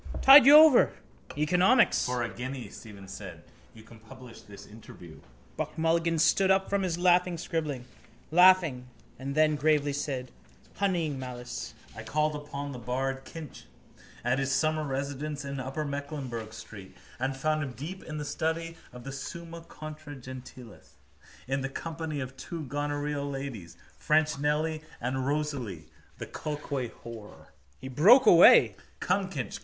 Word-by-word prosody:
Tide 270 0 +9
you 290 - +10
over. 310 -4 +7 0.4
Economics. 180 - +3
—For 125 -1 -1
a 115 - -3
guinea, 130 0 -6
Stephen 100 -4 -12
said, - - -9 0.3
you 110 - -14
can 115 0 -16
publish 125 +1 -13
this 100 -1 -13
interview. 90 -6 -13 0.4
Buck - - -4
Mulligan 165 +1 +1
stood 165 +5 +3
up 190 0 +2
from 200 0 +1
his 180 -3 -1
laughing 180 0 +3
scribbling, 155 -6 -3 0.5
laughing: 175 -7 +5 0.3
and 135 +1 -5
then 155 0 +4
gravely 145 -1 +1
said, 130 -3 -4 0.5
honeying 170 -8 -1
malice: 125 -1 -7 0.2
—I 110 - -7
called 150 +7 -1
upon 145 -1 -6
the 125 - -7
bard 135 +2 -3
Kinch 160 -5 -10 0.6
at 120 +3 +1
his 135 0 -1
summer 155 +2 +1
residence 140 +1 -4
in 140 0 -5
upper 135 +4 -4
Mecklenburgh 140 -6 -5
street 110 -4 -11 0.2
and 135 +1 -2
found 155 +2 0
him 135 -4 -4
deep 170 +9 -8
in 155 - -7
the 150 - -4
study 165 +2 -3
of 125 -1 -11
the 135 - -7
Summa 165 +5 -8
contra 155 -2 -10
Gentiles 130 -2 -12 0.5
in 135 +1 -1
the 135 - -3
company 160 0 -5
of 130 0 -6
two 165 +4 -6
gonorrheal 145 +1 -3
ladies, 135 -11 -7 0.2
Fresh 155 -1 +1
Nelly 155 +2 0 0.2
and 130 +2 -2
Rosalie, 140 - -3 0.3
the - - -6
coalquay 145 -4 -4
whore. 115 -3 -12 0.3
He - - -8
broke 200 - +6
away. 150 - +7 0.2
—Come, 190 +1 0
Kinch. 140 -9 -5
145 Hz, 150 wpm, -28 LUFS, 130-160 Hz, 0.6 s, you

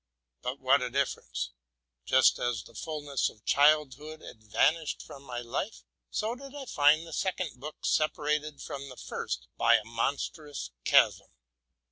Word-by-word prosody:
But 130 +2 -3
what 135 +1 +4
a 125 - -1
difference! 65 - -2 0.5
Just - - +5
as 120 -4 -1
the - - -16
ful 155 -2 -4
ness 140 -3 0
of 105 - -19
childhood 150 +1 +3
had 110 - -11
vanished 150 +9 +1
from 140 - -11
my 125 -3 -5
life, 130 - -4 0.3
so 220 +2 -1
did 275 +2 -10
I 280 -2 -6
find 150 - +4
the 165 - -9
second 180 -7 -2
book 150 +3 -8
separated 150 -1 0
from 140 0 -6
the 125 - -11
first - - -4
by - - +6
a - - +2
monstrous 135 - -3
chasm. - - +4
145 Hz, 155 wpm, -30 LUFS, 125-155 Hz, 0.5 s, by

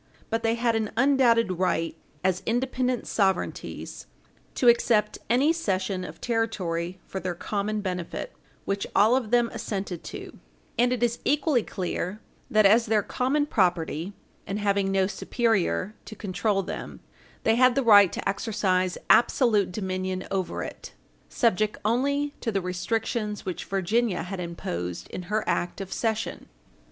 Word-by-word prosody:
But 225 0 +1
they 225 0 +1
had 235 -1 +1
an 220 -1 0
undoubted 235 -8 +3
right, 165 -3 0 0.3
as 185 0 +1
independent 250 +1 0
sovereignties, 190 -3 -2 0.5
to 250 - +2
accept 230 -3 +4
any 270 +7 +4
cession 190 - -1
of - - -8
territory 185 -7 -1
for 190 - -5
their 185 -2 -3
common 210 +3 -2
benefit, 180 - -4 0.3
which 200 0 -2
all 220 +4 +5
of 250 -5 -1
them 240 0 +3
assented 195 -4 -4
to; - - -8 0.4
and 245 +1 +3
it 245 -1 0
is 240 0 +1
equally 285 -2 +2
clear 185 0 -4 0.3
that 215 -1 +4
as 225 +4 +5
their 210 -1 +2
common 280 +4 0
property, 175 - 0 0.3
and 195 - -2
having 200 -2 +1
no 195 -1 +3
superior 205 - 0
to 215 - -9
control 195 0 -1
them, - - -7 0.4
they 225 - +4
had 255 +1 +5
the 275 - +2
right 205 -5 +7
to - - -4
exercise 195 -3 0
absolute 230 -5 +4
dominion 185 -1 -3
over 190 -2 -2
it, - - -8 0.4
subject 215 -2 +1
only 280 +6 +1
to 230 - -1
the 200 - +1
restrictions 210 +4 -2
which 185 -2 -4
Virginia 195 0 0
had 185 +1 -5
imposed 90 - -4
in - - -5
her 215 +1 +1
act 175 +2 -1
of 190 -1 -5
cession. 220 -1 -2
210 Hz, 145 wpm, -26 LUFS, 185-235 Hz, 0.5 s, right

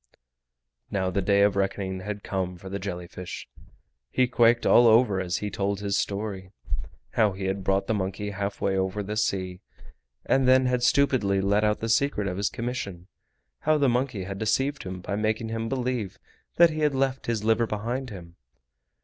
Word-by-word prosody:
Now 95 -2 -1
the 100 - 0
day 100 +1 +3
of 100 -1 +3
reckoning 95 -1 -1
had 105 +2 -5
come 90 -2 -3
for 95 +2 -10
the 100 +1 -4
jelly 90 -2 -5
fish. 90 +1 -8 0.6
He 130 - +2
quaked 120 -1 +3
all 120 - +7
over 110 -4 +4
as 90 0 -1
he 105 -1 -4
told 100 0 -1
his 100 -1 -1
story. 100 -2 -3 0.6
How 110 -4 +2
he 95 +1 -5
had 95 0 -2
brought 95 +1 +1
the 110 - 0
monkey 100 +1 -3
halfway 100 0 -2
over 95 +2 -1
the 105 +2 -4
sea, 95 -4 -1 0.6
and 135 -1 +3
then 130 0 +5
had 125 -1 +1
stupidly 120 -6 +3
let 100 +2 +2
out 105 0 +1
the 115 - -1
secret 115 -2 +1
of 90 -1 -3
his 100 0 0
commission; 110 -7 -5 0.5
how 155 - +2
the 140 -3 +3
monkey 120 -5 -1
had 95 +1 -6
deceived 135 +7 0
him 95 -1 -6
by 100 - -3
making 110 +2 -1
him 115 0 -3
believe 125 -6 -2 0.4
that 170 -1 +6
he 155 - -4
had 150 -2 +2
left 135 0 -1
his 115 -3 -1
liver 115 +1 +2
behind 120 +5 -3
him. 85 -5 -11
105 Hz, 185 wpm, -26 LUFS, 95-120 Hz, 0.6 s, all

